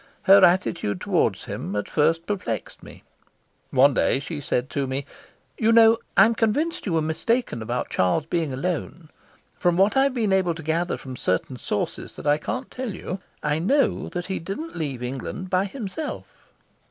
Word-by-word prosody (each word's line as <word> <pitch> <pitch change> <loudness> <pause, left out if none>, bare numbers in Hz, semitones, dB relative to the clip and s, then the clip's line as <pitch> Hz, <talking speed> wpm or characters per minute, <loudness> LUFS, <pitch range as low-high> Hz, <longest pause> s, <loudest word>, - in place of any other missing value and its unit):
Her 195 0 +7
attitude 170 - +2
towards - - +1
him 100 - -5
at 105 - -2
first 165 +2 +1
perplexed 205 -1 -4
me. - - -13 0.7
One 135 +2 +5
day - - +2
she 145 +1 -6
said 125 -2 -1
to 140 -2 -1
me: 135 +1 -3 0.5
"You 225 0 +3
know, 225 0 +6 0.2
I'm 230 - +7
convinced 235 +8 0
you 180 - 0
were 160 -1 +2
mistaken 160 - -1
about 120 +3 -3
Charles 95 - +1
being 165 -3 -1
alone. 165 +3 -4 0.5
From 175 -1 +1
what 195 +5 +4
I've 270 0 +3
been 215 -5 +1
able 180 -3 +2
to 160 - -8
gather 165 +3 0
from 130 -1 -8
certain 105 +7 -1
sources - - -4
that - - -9
I 145 +1 +3
can't 255 - -4
tell 250 -6 -4
you, 185 +1 -5 0.2
I 150 +1 +1
know 270 - +1
that 175 -1 -4
he 190 - -3
didn't 250 - -6
leave 140 -6 -4
England 135 +9 -5
by 185 +1 +2
himself." 230 +7 -5
175 Hz, 175 wpm, -24 LUFS, 140-210 Hz, 0.7 s, Her